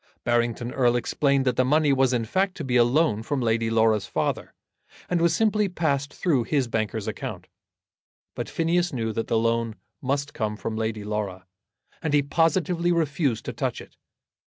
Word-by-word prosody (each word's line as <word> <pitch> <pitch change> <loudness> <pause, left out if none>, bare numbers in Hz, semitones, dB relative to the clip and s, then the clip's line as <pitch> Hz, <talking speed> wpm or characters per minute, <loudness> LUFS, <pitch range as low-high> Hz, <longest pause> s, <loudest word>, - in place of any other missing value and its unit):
Barrington 120 0 0
Erle 120 -2 +2
explained 140 +2 +1
that 125 -2 +1
the 130 - +4
money 145 +2 +3
was 135 -1 +3
in 120 -3 0
fact 190 - 0
to 160 - -4
be 130 -2 -1
a 120 - +7
loan 125 -2 +2
from 140 +5 -2
Lady 115 -1 +1
Laura's 110 -3 +2
father, - - -2 0.5
and 175 -2 0
was 170 0 +3
simply 210 -2 +2
passed 145 -5 -1
through 135 -9 0
his 140 -3 +1
banker's 110 -2 -2
account. - - -5 0.9
But - - -5
Phineas 175 +2 +1
knew 115 -5 -2
that 115 - -2
the 115 - +1
loan 115 0 0 0.3
must 140 +2 -2
come 105 -1 -2
from 110 - -4
Lady 110 -1 -2
Laura, 100 -3 -4 0.6
and 150 -2 0
he 145 - +4
positively 170 +3 +1
refused 150 -7 0
to - - -4
touch - - -2
it. - - -13
130 Hz, 180 wpm, -25 LUFS, 115-155 Hz, 0.9 s, a